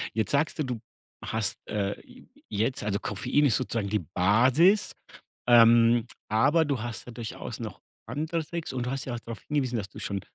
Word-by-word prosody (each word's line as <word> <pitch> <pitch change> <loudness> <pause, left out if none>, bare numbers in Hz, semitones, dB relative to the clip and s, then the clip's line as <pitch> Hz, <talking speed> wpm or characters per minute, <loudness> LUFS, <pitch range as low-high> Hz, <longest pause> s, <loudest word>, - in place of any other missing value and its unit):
Jetzt 110 -2 0
sagst 150 +3 +1
du, - - +2
du 125 -4 -3 0.4
hast, 110 -1 -1
äh, 100 -1 -2
je - - -16 0.4
jetzt 130 0 -1
also 105 -1 -1
Koffein 125 +8 +1
ist 125 -6 +4
sozusagen 115 -5 -2
die 105 - +1
Basis, 130 - +4 0.5
ähm, 115 0 +6 0.2
aber 145 +9 +3
du 140 -6 -1
hast 120 -1 -5
ja - - -7
durchaus 115 -1 -6
noch - - -7 0.3
andere 155 +5 -2
Tricks 170 -1 -5
und 125 -1 -2
du 125 - -2
hast 135 0 -3
ja 125 - -4
auch - - -5
drauf 115 0 -8
hingewiesen, 130 -5 0
dass 100 -3 -4
du 105 - -11
schon 100 -2 -3
120 Hz, 190 wpm, -27 LUFS, 110-140 Hz, 0.5 s, ähm